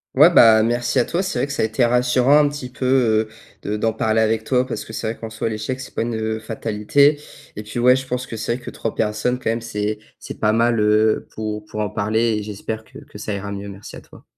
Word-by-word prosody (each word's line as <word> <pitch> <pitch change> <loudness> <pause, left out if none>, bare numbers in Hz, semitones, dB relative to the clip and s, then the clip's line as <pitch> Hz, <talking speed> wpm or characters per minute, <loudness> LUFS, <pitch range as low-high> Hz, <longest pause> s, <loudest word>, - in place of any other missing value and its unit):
Ouais, 150 +6 +7
bah, 110 -6 +7
merci 120 +1 0
à 120 - +4
toi, 170 - -1
c'est 190 -8 -3
vrai 125 - +1
que 140 - -6
ça - - -1
a - - +3
été 120 +3 +1
rassurant 125 +4 +3
un 145 -1 +3
petit 145 -3 -7
peu, 125 -4 +2
heu, - - -21 0.3
de 105 +1 -3
d'en 110 +1 0
parler 110 0 +1
avec 110 0 +1
toi 125 +2 +1
parce 130 - -5
que - - -11
c'est - - -5
vrai - - -18
qu'en 115 - -6
soit 110 +1 -3
l'échec, 110 +4 -4
c'est 130 - -9
pas - - -2
une, 115 0 -2
heu, 110 0 -2
fatalité 115 +7 +1 0.3
et 105 - -5
puis, 105 +2 -8
ouais, 125 +1 +5
je 130 0 -4
pense 125 0 -3
que 115 - -7
c'est 115 +2 -2
vrai 125 - -10
que - - -6
3 115 - -4
personnes 110 +3 0
quand 125 - -1
même, 115 +1 -2
c'est 105 -2 -3 0.2
c'est - - -9
pas 105 - +2
mal, 115 +1 +2
heu, 105 +1 +2
pour 105 -1 -4
pour 105 0 -5
en 105 - -2
parler 110 +1 0
et - - -5
j'espère 110 +2 -6
que - - -15
que 105 - -12
ça 105 -1 -3
ira 100 +1 -5
mieux. 100 0 -6
Merci 100 +1 -10
à - - -11
toi. - - -18
110 Hz, 270 wpm, -21 LUFS, 110-125 Hz, 0.3 s, Ouais